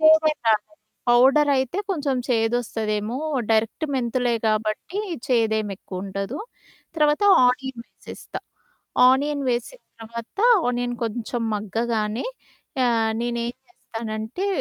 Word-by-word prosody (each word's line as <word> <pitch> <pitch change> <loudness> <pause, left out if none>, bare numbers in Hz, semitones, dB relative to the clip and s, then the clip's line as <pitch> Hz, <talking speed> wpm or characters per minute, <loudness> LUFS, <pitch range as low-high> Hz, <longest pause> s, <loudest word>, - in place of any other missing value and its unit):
చేదేం 315 -1 +5
రాదు. 215 +5 +2 0.4
పౌడరయితే 265 +4 +4
కొంచెం 290 -7 0
చేదొస్తదేమో 225 -2 0 0.3
డైరెక్టు 225 +7 +1
మెంతులే 245 -1 0
కాబట్టి 215 - -1 0.3
చేదేమి 220 -5 +1
ఎక్కువుండదు. 195 +6 -5 0.6
తర్వాత 300 +4 +3 0.2
ఆనియన్సేస్తా. 250 -1 -4 0.7
ఆనియన్ 285 +2 +2
వేసిన 245 - -3 0.2
తర్వాత 230 - -8 0.3
ఆనియన్ 245 0 -1
కొంచెం 230 +1 -3
మగ్గగానే, 215 +1 -1 0.6
ఆహ్, 225 -2 +2
నేనేం 235 0 -2 0.2
చేస్తానంటే 225 - -5
240 Hz, 85 wpm, -23 LUFS, 220-265 Hz, 0.7 s, చేదేం